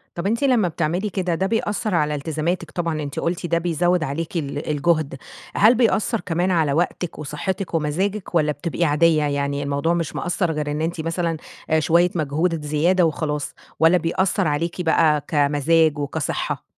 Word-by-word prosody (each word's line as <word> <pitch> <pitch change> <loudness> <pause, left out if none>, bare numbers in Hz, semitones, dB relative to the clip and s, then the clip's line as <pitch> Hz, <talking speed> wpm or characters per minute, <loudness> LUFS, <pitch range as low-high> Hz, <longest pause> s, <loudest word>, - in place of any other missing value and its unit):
طب 175 +3 -2
أنتِ 230 +6 0
لما 240 -9 +3
بتعملي 170 +5 -1
كده 180 -3 -1
ده 190 +3 0
بيأثر 210 -3 -1
على 150 -2 +1
التزاماتِك 160 +3 -2
طبعًا 165 -3 -2
أنتِ 140 -1 -4
قلتِ 170 +1 -2
ده 170 0 +1
بيزود 175 0 +1
عليكِ 160 +4 -3
ال 145 0 -4
الجهد، 155 -1 +1 0.4
هل 225 +4 +6
بيأثر 230 -1 +1
كمان 175 +2 0
على 155 -5 +2
وقتِك 175 0 -2
وصحتِك 170 +5 -4
ومزاجِك، 180 +5 -1
والّا 150 -2 +3
بتبقي 170 +4 -2
عادية؟ 155 +1 +3
يعني 140 0 -1
الموضوع 140 +4 0
مش 165 -3 -2
مأثر 175 -1 -1
غير 150 -1 -2
إن 150 +1 -2
أنتِ 165 0 -2
مثلًا 165 0 -1 0.3
آآ 160 0 +3
شوية 170 +3 +3
مجهود 155 +1 -1
زيادة 170 +4 +2
وخلاص، 150 -2 -2 0.3
والّا 165 +3 +5
بيأثر 180 +2 0
عليكِ 165 +4 -1
بقى 160 -3 +2
كمزاج 150 +1 +2
وكصحة؟ 145 +2 -3
165 Hz, 165 wpm, -22 LUFS, 150-175 Hz, 0.4 s, هل